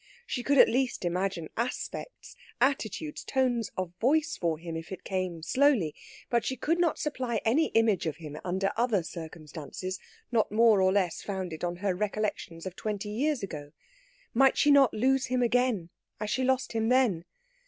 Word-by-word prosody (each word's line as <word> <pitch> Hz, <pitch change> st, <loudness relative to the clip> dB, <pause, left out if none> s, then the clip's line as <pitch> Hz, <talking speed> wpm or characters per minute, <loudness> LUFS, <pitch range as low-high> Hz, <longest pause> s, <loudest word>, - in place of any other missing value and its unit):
She 250 Hz, -, -3 dB
could 280 Hz, +3 st, +2 dB
at -, -, +9 dB
least 255 Hz, -5 st, 0 dB
imagine 180 Hz, -1 st, -1 dB
aspects, 250 Hz, -, -5 dB, 0.2 s
attitudes, 275 Hz, +3 st, 0 dB
tones 245 Hz, -5 st, 0 dB
of 185 Hz, -2 st, -3 dB
voice 305 Hz, +5 st, +2 dB
for 165 Hz, -3 st, -1 dB
him 165 Hz, 0 st, -6 dB
if 165 Hz, +2 st, -7 dB
it 190 Hz, -, -7 dB
came 185 Hz, -4 st, -3 dB
slowly; 245 Hz, -, +3 dB, 0.3 s
but 235 Hz, -1 st, +1 dB
she 260 Hz, -, -2 dB
could 330 Hz, +7 st, 0 dB
not 340 Hz, -3 st, +2 dB
supply 255 Hz, -6 st, -2 dB
any 285 Hz, +9 st, +3 dB
image 220 Hz, -6 st, +3 dB
of 155 Hz, -, -2 dB
him, 155 Hz, -3 st, -8 dB
under 190 Hz, +2 st, 0 dB
other 225 Hz, -6 st, +1 dB
circumstances, 165 Hz, +2 st, -7 dB, 0.3 s
not 225 Hz, -4 st, +2 dB
more 220 Hz, -2 st, +5 dB
or 185 Hz, 0 st, +4 dB
less 190 Hz, -4 st, 0 dB
founded 185 Hz, -5 st, -5 dB
on 175 Hz, 0 st, -1 dB
her 195 Hz, -, +2 dB
recollections 200 Hz, -3 st, -3 dB
of 185 Hz, -1 st, -5 dB
twenty 210 Hz, 0 st, -4 dB
years 260 Hz, +3 st, 0 dB
ago. 145 Hz, -6 st, -6 dB, 0.6 s
Might 270 Hz, +2 st, +4 dB
she 295 Hz, -, +5 dB
not 280 Hz, -3 st, +6 dB
lose 265 Hz, +4 st, +2 dB
him 250 Hz, 0 st, +1 dB
again, 240 Hz, -7 st, +1 dB, 0.3 s
as 210 Hz, 0 st, -3 dB
she 260 Hz, -, 0 dB
lost 260 Hz, 0 st, +1 dB
him 225 Hz, 0 st, 0 dB
then? 240 Hz, -10 st, +3 dB
215 Hz, 175 wpm, -29 LUFS, 180-255 Hz, 0.6 s, at